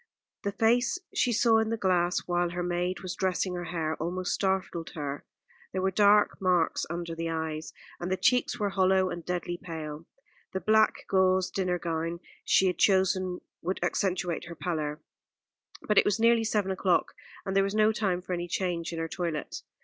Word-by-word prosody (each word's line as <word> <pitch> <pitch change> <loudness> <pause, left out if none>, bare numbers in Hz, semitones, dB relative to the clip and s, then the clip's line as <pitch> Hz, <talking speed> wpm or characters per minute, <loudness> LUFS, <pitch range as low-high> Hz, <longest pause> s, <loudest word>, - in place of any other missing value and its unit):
The 200 - -2
face 245 - +2 0.2
she 245 - +2
saw 225 0 +4
in 220 0 0
the 230 - -1
glass 180 -3 +1
while 175 0 +1
her 175 +1 -3
maid 175 +1 -1
was 185 -1 -4
dressing 185 0 -1
her 175 -1 -4
hair 160 -2 -2
almost 180 +3 -2
startled 190 -4 -1
her. 145 -2 -4 0.5
There 185 - -1
were 190 - +2
dark 205 +1 +4
marks 180 -3 +1
under 170 0 -4
the 165 0 -3
eyes, 160 -1 -3 0.3
and 175 +1 -4
the 190 - +1
cheeks 250 +2 +2
were 205 -1 +1
hollow 190 -1 +3
and 175 - -6
deadly 175 0 -3
pale. 160 -3 -7 0.5
The 190 - -1
black 215 +2 +3
gauze 185 -1 +2
dinner 185 -2 0
gown 165 0 -3 0.2
she 190 - +4
had 180 -1 0
chosen 185 -2 +2 0.2
would 185 +3 -2
accentuate 180 -3 -1
her 170 - -8
pallor; 155 -3 -3 0.8
but 210 - +4
it - - +3
was 205 +1 +1
nearly 230 0 +4
seven 210 -3 0
o'clock, 185 -1 +1 0.3
and 195 - -2
there 195 - +5
was 195 +1 -2
no 215 0 +4
time 195 -5 -1
for 185 - -4
any 175 0 -3
change 175 -2 -2
in 165 - -5
her 165 0 -2
toilet. 165 -3 -4
180 Hz, 185 wpm, -28 LUFS, 170-195 Hz, 0.8 s, there